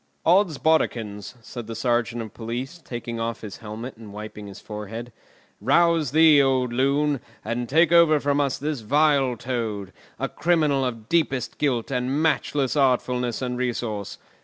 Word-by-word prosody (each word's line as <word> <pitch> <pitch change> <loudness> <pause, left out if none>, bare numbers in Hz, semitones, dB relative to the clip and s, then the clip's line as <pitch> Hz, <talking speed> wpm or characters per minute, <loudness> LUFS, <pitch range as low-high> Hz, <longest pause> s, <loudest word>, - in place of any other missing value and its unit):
"Oddsbodikins!" 155 - +1
said 120 -2 -8
the 115 - -6
sergeant 120 -1 0
of 110 - -10
police, 125 +8 -5
taking 120 -2 -5
off 115 0 -3
his 105 -3 -8
helmet 110 +3 -7
and 110 -2 -11
wiping 105 0 -8
his 100 - -10
forehead. 110 +2 -7 0.5
"Rouse 165 +4 +3
thee, 155 0 +6
old 130 -3 +1
loon, 140 +2 +1 0.3
and 120 +1 -3
take 165 +4 +4
over 170 -3 +6
from 145 0 +1
us 140 -2 0
this 150 -1 -3
vile 135 +1 +2
Toad, 110 -6 -4 0.2
a - - -1
criminal 155 -5 +1
of 115 -4 -4
deepest 150 -6 0
guilt 130 -4 0
and 130 +2 0
matchless 145 -3 +1
artfulness 125 -3 +1
and 125 -1 -3
resource. 115 -5 -3
125 Hz, 150 wpm, -24 LUFS, 115-145 Hz, 0.5 s, thee